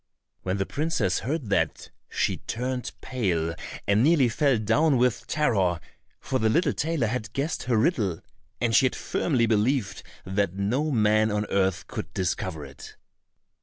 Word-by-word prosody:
When 95 +1 -2
the 95 - 0
princess 140 - 0
heard 135 -4 -3
that, - - 0 0.2
she - - 0
turned 125 +1 -4
pale 90 -10 -1 0.3
and 100 +2 +3
nearly 145 -4 +4
fell 135 +2 +2
down 130 +8 +2
with 120 -1 +1
terror, 100 - +1 0.4
for 130 - -2
the 110 - +2
little 155 +4 +2
tailor 155 -4 0
had 110 -1 -3
guessed 145 +1 -2
her 120 -2 +2
riddle, 110 - +1 0.4
and 115 -2 +1
she 130 - +6
had - - -4
firmly 130 -8 0
believed 110 0 +1 0.2
that 95 -1 -1
no 120 +11 0
man 110 -3 +3
on 105 0 -1
earth 95 -2 +1
could - - -6
discover 80 -4 -2
it. 70 +2 -12
115 Hz, 155 wpm, -26 LUFS, 100-135 Hz, 0.4 s, she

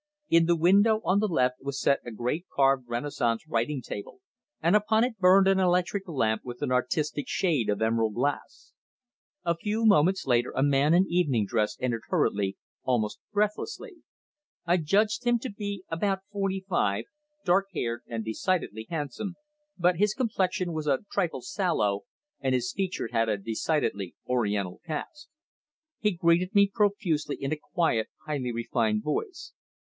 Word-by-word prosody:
In 165 0 +5
the 170 - +4
window 200 +6 +4
on 190 +2 +3
the 215 - +1
left 125 -8 +1
was 140 0 -4
set 140 - +3
a - - -7
great 125 - -3
carved 135 -2 +2
Renaissance 120 -2 -1
writing 125 +4 -1
table, 100 - -7 0.4
and 170 +5 +3
upon 220 +2 +3
it 240 -4 -2
burned 190 +1 +6
an 195 0 +4
electric 180 +2 +1
lamp 115 -9 0
with 125 +2 -7
an 135 - -1
artistic 145 +4 0
shade 155 - +1
of 105 +1 0
emerald 110 -1 +1
glass. 145 - -3 0.7
A 170 0 +2
few 215 +6 -1
moments 190 -2 +4
later 120 -1 +2
a 135 - +2
man 145 +3 +4
in 185 +2 +5
evening 145 -12 +1
dress 105 +1 0
entered 120 -3 -1
hurriedly 100 -3 +1 0.2
almost 115 -5 -1
breathlessly. 290 - -2 0.7
I 175 +1 +3
judged 205 +8 +1
him 240 0 +3
to 250 +1 -6
be 200 -2 -5
about 190 +4 -1
forty 195 -2 -2
five, 100 - 0 0.4
dark 195 +2 +3
haired 120 -8 -3
and 115 -2 -4
decidedly 110 - -2
handsome, 165 - -4 0.4
but 180 -1 +3
his 210 +2 +2
complexion 190 -7 -1
was 155 -1 -3
a 140 +6 +1
trifle 180 -5 -1
sallow, 160 - 0 0.3
and 130 -1 +1
his 125 -1 -1
features 185 - -3
had 115 -1 +1
a 105 - +1
decidedly 110 - -2
Oriental 105 -7 -1
cast. 175 - -6 0.7
He 210 - +2
greeted 175 +2 +1
me 200 0 +6
profusely 195 -9 0
in 135 +2 -2
a - - 0 0.2
quiet, 160 - +2 0.2
highly 135 -5 -2
refined 115 -2 0
voice. 320 - -4
160 Hz, 160 wpm, -27 LUFS, 120-195 Hz, 0.7 s, burned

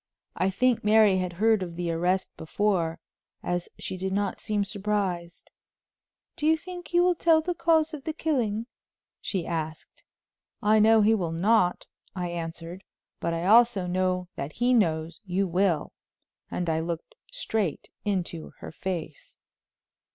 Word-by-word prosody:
I 185 - +1
think 250 +5 +1
Mary 210 -2 +5
had 180 -1 -2
heard 215 +3 +3
of 175 -2 -5
the 175 -1 -2
arrest 180 +3 0
before, 170 -1 -1 0.4
as 175 0 -2
she 185 - -5
did 190 +1 -3
not 200 -1 -1
seem 205 -1 0
surprised. 195 -4 -3 0.8
"Do 300 - -1
you 320 0 +5
think 355 +2 -9
he 350 - +2
will 360 0 +4
tell 325 -1 +4
the 355 +3 -2
cause 325 -1 +2
of 290 -3 -6
the 315 - -1
killing?" 240 -9 -1 0.6
she 185 -5 -2
asked. 160 -1 -5 0.6
"I 215 +1 +4
know 220 +1 +6
he 215 +2 +5
will 180 -7 -1
not," 180 +2 +2 0.3
I 180 -2 -2
answered; 170 +2 -6 0.4
"but 170 - -1
I 165 +1 -2
also 220 -2 +5
know 180 0 0
that 140 +2 -5
he 245 +1 +2
knows 165 -7 +1
you 195 0 0
will," 180 -2 +1 0.6
and 175 - -3
I 160 -1 +1
looked 165 - -4 0.2
straight 220 - -2
into 180 -5 -3
her - - -9
face. 165 -3 -6
190 Hz, 150 wpm, -27 LUFS, 170-225 Hz, 0.8 s, know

